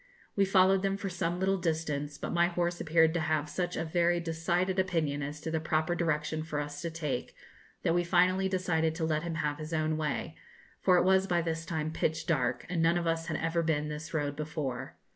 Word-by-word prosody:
We 200 Hz, -, +4 dB
followed 190 Hz, 0 st, +4 dB
them 195 Hz, 0 st, 0 dB
for 200 Hz, -1 st, -4 dB
some 175 Hz, -1 st, -2 dB
little 190 Hz, 0 st, +1 dB
distance, 150 Hz, -4 st, -2 dB
but -, -, -4 dB
my 170 Hz, 0 st, +4 dB
horse 175 Hz, 0 st, -1 dB
appeared 160 Hz, 0 st, +4 dB
to 175 Hz, -, 0 dB
have 155 Hz, -1 st, 0 dB
such 180 Hz, +1 st, -2 dB
a -, -, -1 dB
very 175 Hz, +1 st, +2 dB
decided 175 Hz, +3 st, 0 dB
opinion 160 Hz, -6 st, 0 dB
as 145 Hz, +2 st, -4 dB
to 160 Hz, -, -4 dB
the 160 Hz, -, 0 dB
proper 160 Hz, +1 st, 0 dB
direction 155 Hz, -2 st, -1 dB
for 155 Hz, -2 st, -3 dB
us 145 Hz, 0 st, -5 dB
to 170 Hz, -, -2 dB
take, 150 Hz, -6 st, -4 dB, 0.5 s
that 165 Hz, -, +2 dB
we 175 Hz, 0 st, +2 dB
finally 185 Hz, +2 st, +3 dB
decided 160 Hz, -4 st, +1 dB
to 165 Hz, -1 st, -1 dB
let 155 Hz, -1 st, 0 dB
him 170 Hz, -1 st, -4 dB
have 150 Hz, -1 st, -1 dB
his 155 Hz, +1 st, -6 dB
own 155 Hz, 0 st, +1 dB
way, 155 Hz, +1 st, -2 dB, 0.5 s
for 185 Hz, -2 st, +5 dB
it -, -, +4 dB
was 190 Hz, +1 st, +4 dB
by 175 Hz, -2 st, +1 dB
this 165 Hz, -1 st, -3 dB
time 155 Hz, -1 st, -2 dB
pitch 160 Hz, 0 st, -1 dB
dark, 125 Hz, -7 st, 0 dB
and 175 Hz, -2 st, -1 dB
none 165 Hz, +1 st, +4 dB
of 175 Hz, -, -1 dB
us 165 Hz, 0 st, 0 dB
had 160 Hz, -, -1 dB
ever 165 Hz, +1 st, 0 dB
been 150 Hz, -2 st, 0 dB
this 150 Hz, +1 st, -6 dB
road 145 Hz, -2 st, -1 dB
before. 150 Hz, -4 st, -4 dB
165 Hz, 220 wpm, -30 LUFS, 155-175 Hz, 0.5 s, for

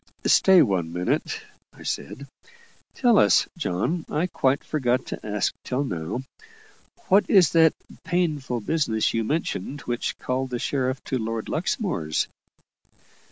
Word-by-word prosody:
"Stay 190 Hz, -2 st, +6 dB
one 90 Hz, -5 st, -1 dB
minute," 90 Hz, +1 st, -1 dB, 0.3 s
I -, -, -14 dB
said. 140 Hz, -, -4 dB, 0.7 s
"Tell 240 Hz, -4 st, +4 dB
us, -, -, +4 dB
John 160 Hz, -, -1 dB
I 155 Hz, +4 st, 0 dB
quite 135 Hz, -6 st, 0 dB
forgot 130 Hz, -4 st, 0 dB
to -, -, -7 dB
ask 105 Hz, -1 st, -1 dB
till 130 Hz, +2 st, -1 dB
now 90 Hz, -, -4 dB, 0.9 s
what 200 Hz, +2 st, +4 dB
is 185 Hz, -6 st, +6 dB
that 160 Hz, -2 st, +5 dB, 0.3 s
'painful 155 Hz, -8 st, -1 dB
business' 115 Hz, -5 st, 0 dB
you 115 Hz, -, 0 dB
mentioned, 145 Hz, -, -3 dB
which 120 Hz, 0 st, -3 dB
called 130 Hz, +1 st, -2 dB
the 125 Hz, -, -2 dB
sheriff 130 Hz, +1 st, -1 dB
to 130 Hz, -, -2 dB
Lord 115 Hz, 0 st, -3 dB
Luxmore's?" 155 Hz, -, -1 dB
130 Hz, 130 wpm, -24 LUFS, 110-165 Hz, 0.9 s, Stay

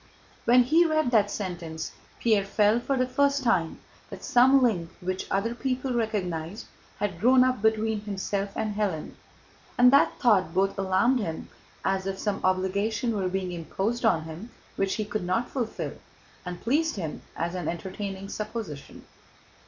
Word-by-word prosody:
When 245 Hz, +1 st, +6 dB
he 315 Hz, +8 st, +4 dB
read 310 Hz, -6 st, +1 dB
that 210 Hz, -4 st, +4 dB
sentence, 170 Hz, -6 st, -5 dB, 0.3 s
Pierre 215 Hz, -4 st, +3 dB
felt 210 Hz, +3 st, +2 dB
for 270 Hz, +2 st, -1 dB
the 255 Hz, -, +2 dB
first 280 Hz, +2 st, +1 dB
time 180 Hz, -9 st, +1 dB, 0.3 s
that -, -, -9 dB
some 265 Hz, 0 st, +5 dB
link 180 Hz, -9 st, +1 dB
which 185 Hz, +1 st, -3 dB
other 210 Hz, +4 st, 0 dB
people 255 Hz, +1 st, -2 dB
recognized 200 Hz, -5 st, -2 dB, 0.3 s
had 195 Hz, -4 st, -3 dB
grown 255 Hz, +5 st, +6 dB
up 255 Hz, -4 st, +1 dB
between 220 Hz, -1 st, +1 dB
himself 200 Hz, -1 st, -3 dB
and 215 Hz, -1 st, -2 dB
Hélène, 200 Hz, -7 st, -2 dB, 0.7 s
and 250 Hz, +1 st, +6 dB
that 280 Hz, -, +4 dB
thought 190 Hz, -8 st, +3 dB
both 195 Hz, +1 st, +2 dB
alarmed 195 Hz, +7 st, +2 dB
him, 165 Hz, -7 st, -4 dB, 0.4 s
as 190 Hz, 0 st, 0 dB
if 195 Hz, 0 st, -3 dB
some 205 Hz, 0 st, -2 dB
obligation 200 Hz, +5 st, 0 dB
were 190 Hz, -3 st, 0 dB
being 185 Hz, -1 st, -2 dB
imposed 195 Hz, +8 st, -3 dB
on 180 Hz, -9 st, +3 dB
him 165 Hz, +8 st, -8 dB, 0.3 s
which 195 Hz, -1 st, 0 dB
he 215 Hz, -, -2 dB
could 210 Hz, -1 st, -3 dB
not 185 Hz, +7 st, -1 dB
fulfill, 240 Hz, -5 st, -3 dB, 0.5 s
and 175 Hz, -1 st, -6 dB
pleased 310 Hz, +7 st, +1 dB
him 165 Hz, -7 st, -5 dB
as 170 Hz, +1 st, -2 dB
an 180 Hz, -4 st, -4 dB
entertaining 190 Hz, +3 st, -5 dB
supposition. 210 Hz, -9 st, -6 dB
205 Hz, 160 wpm, -27 LUFS, 185-240 Hz, 0.7 s, When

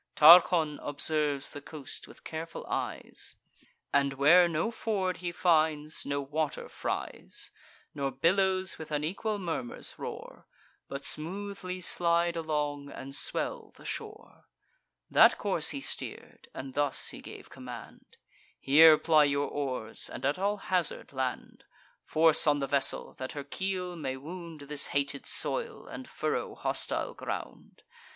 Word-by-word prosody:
Tarchon 160 Hz, -1 st, +7 dB
observes 145 Hz, -1 st, 0 dB
the 145 Hz, -, -7 dB
coast 145 Hz, -1 st, -7 dB
with -, -, -16 dB
careful 165 Hz, +1 st, -6 dB
eyes, -, -, -4 dB, 0.6 s
And, 140 Hz, -1 st, +3 dB
where 165 Hz, +6 st, +6 dB
no 165 Hz, +7 st, 0 dB
ford 200 Hz, -5 st, -1 dB
he 175 Hz, -1 st, -4 dB
finds, 155 Hz, -3 st, +1 dB
no 140 Hz, 0 st, -1 dB
water 150 Hz, +1 st, -2 dB
fries, -, -, -4 dB, 0.4 s
Nor 140 Hz, -1 st, -1 dB
billows 185 Hz, +7 st, +1 dB
with 160 Hz, -, -7 dB
unequal 165 Hz, +8 st, -1 dB
murmurs 165 Hz, -10 st, -4 dB
roar, -, -, -8 dB, 0.4 s
But 140 Hz, 0 st, -5 dB
smoothly 185 Hz, +2 st, -3 dB
slide 170 Hz, 0 st, +2 dB
along, 150 Hz, -3 st, -2 dB
and 135 Hz, 0 st, -8 dB
swell 140 Hz, -, -2 dB
the -, -, -16 dB
shore, -, -, -7 dB, 0.6 s
That -, -, +7 dB
course -, -, 0 dB
he -, -, -4 dB
steer'd, -, -, -5 dB
and 130 Hz, 0 st, -7 dB
thus 145 Hz, -1 st, +1 dB
he -, -, -6 dB
gave -, -, -11 dB
command: 125 Hz, -3 st, -10 dB, 0.4 s
"Here 155 Hz, +3 st, +8 dB
ply 155 Hz, -2 st, +5 dB
your 140 Hz, 0 st, 0 dB
oars, 130 Hz, -6 st, -4 dB
and 130 Hz, -, -6 dB
at 145 Hz, +6 st, +1 dB
all 205 Hz, +2 st, +1 dB
hazard 180 Hz, -7 st, -1 dB
land: 130 Hz, -1 st, -3 dB, 0.4 s
Force 160 Hz, 0 st, +4 dB
on 145 Hz, -1 st, +5 dB
the 140 Hz, -, -1 dB
vessel, 140 Hz, 0 st, +2 dB
that 130 Hz, 0 st, -4 dB
her 145 Hz, -2 st, -5 dB
keel 180 Hz, +4 st, -3 dB
may 135 Hz, -5 st, -4 dB
wound 165 Hz, +2 st, -8 dB
This 145 Hz, 0 st, 0 dB
hated 140 Hz, 0 st, -1 dB
soil, 470 Hz, -3 st, 0 dB
and -, -, -9 dB
furrow -, -, -2 dB
hostile -, -, -2 dB
ground. -, -, -7 dB
155 Hz, 135 wpm, -30 LUFS, 140-175 Hz, 0.6 s, Here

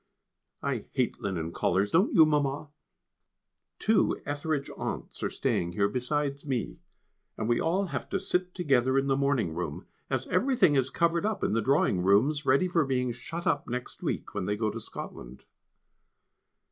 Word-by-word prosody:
I -, -, -2 dB
hate -, -, 0 dB
linen 85 Hz, -5 st, -3 dB
collars, 95 Hz, +4 st, +1 dB
don't 185 Hz, +6 st, +3 dB
you, 160 Hz, -, +7 dB
Mamma? 145 Hz, -1 st, 0 dB, 1.1 s
Two 220 Hz, 0 st, +2 dB
Ethridge 145 Hz, 0 st, -2 dB
aunts -, -, -5 dB
are -, -, 0 dB
staying 85 Hz, 0 st, -1 dB
here 100 Hz, +2 st, +2 dB
besides 140 Hz, +5 st, -2 dB
me, 130 Hz, -6 st, -3 dB, 0.6 s
and 110 Hz, -, -2 dB
we 120 Hz, 0 st, +2 dB
all 185 Hz, +5 st, +1 dB
have 140 Hz, -9 st, -5 dB
to 195 Hz, -, 0 dB
sit 180 Hz, 0 st, -1 dB
together 135 Hz, -7 st, +2 dB
in 135 Hz, -, +2 dB
the 135 Hz, -1 st, +2 dB
morning 140 Hz, -, +1 dB
room, 80 Hz, -3 st, -4 dB, 0.2 s
as -, -, -1 dB
everything 235 Hz, -, +3 dB
is 135 Hz, -2 st, +2 dB
covered 170 Hz, +4 st, +1 dB
up 215 Hz, 0 st, -1 dB
in -, -, +1 dB
the 115 Hz, -, +2 dB
drawing 120 Hz, -6 st, +2 dB
rooms, 125 Hz, -, +3 dB
ready 140 Hz, +8 st, +4 dB
for 170 Hz, -3 st, +2 dB
being 125 Hz, -2 st, 0 dB
shut 165 Hz, +8 st, -6 dB
up 185 Hz, -, +1 dB
next 125 Hz, +1 st, -5 dB
week, -, -, -3 dB
when 100 Hz, -3 st, -2 dB
they 105 Hz, +1 st, -1 dB
go 110 Hz, -1 st, 0 dB
to 115 Hz, -, -6 dB
Scotland. 60 Hz, -, -9 dB
135 Hz, 170 wpm, -28 LUFS, 110-160 Hz, 1.1 s, you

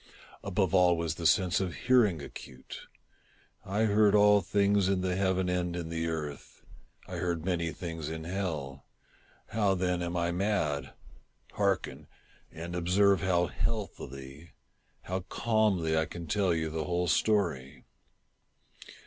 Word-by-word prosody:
Above 95 Hz, -3 st, 0 dB
all 90 Hz, -2 st, +5 dB
was 85 Hz, -1 st, -1 dB
the 85 Hz, -1 st, 0 dB
sense 90 Hz, +1 st, +3 dB
of 95 Hz, -3 st, -3 dB
hearing 110 Hz, -, +3 dB
acute. 65 Hz, -1 st, -10 dB, 0.8 s
I 105 Hz, +3 st, -1 dB
heard 105 Hz, -1 st, +4 dB
all 105 Hz, 0 st, +6 dB
things 100 Hz, +1 st, +2 dB
in 95 Hz, -1 st, +1 dB
the 90 Hz, -1 st, -1 dB
heaven 95 Hz, -1 st, +1 dB
and 90 Hz, -1 st, -1 dB
in 85 Hz, -2 st, -4 dB
the 80 Hz, 0 st, -2 dB
earth. 75 Hz, -4 st, -6 dB, 0.4 s
I -, -, -6 dB
heard 85 Hz, -2 st, -2 dB
many 85 Hz, -3 st, -1 dB
things 80 Hz, -3 st, -6 dB
in 80 Hz, 0 st, -5 dB
hell. 80 Hz, -7 st, -4 dB, 0.6 s
How, 105 Hz, -3 st, +1 dB
then, 90 Hz, -1 st, 0 dB
am 85 Hz, 0 st, -2 dB
I 85 Hz, 0 st, 0 dB
mad? 90 Hz, -6 st, -1 dB, 0.6 s
Hearken! 100 Hz, -2 st, -1 dB, 0.4 s
and 85 Hz, +2 st, -7 dB
observe 95 Hz, +3 st, +3 dB
how 90 Hz, -2 st, +2 dB
healthily 80 Hz, -, -5 dB, 0.2 s
— -, -, -42 dB
how 95 Hz, +1 st, -3 dB
calmly 105 Hz, -8 st, +1 dB
I 80 Hz, 0 st, +2 dB
can 85 Hz, +1 st, -7 dB
tell 95 Hz, +4 st, +1 dB
you 80 Hz, -1 st, -1 dB
the 80 Hz, -1 st, -3 dB
whole 90 Hz, +2 st, 0 dB
story. 85 Hz, -12 st, 0 dB
90 Hz, 140 wpm, -30 LUFS, 80-100 Hz, 0.8 s, all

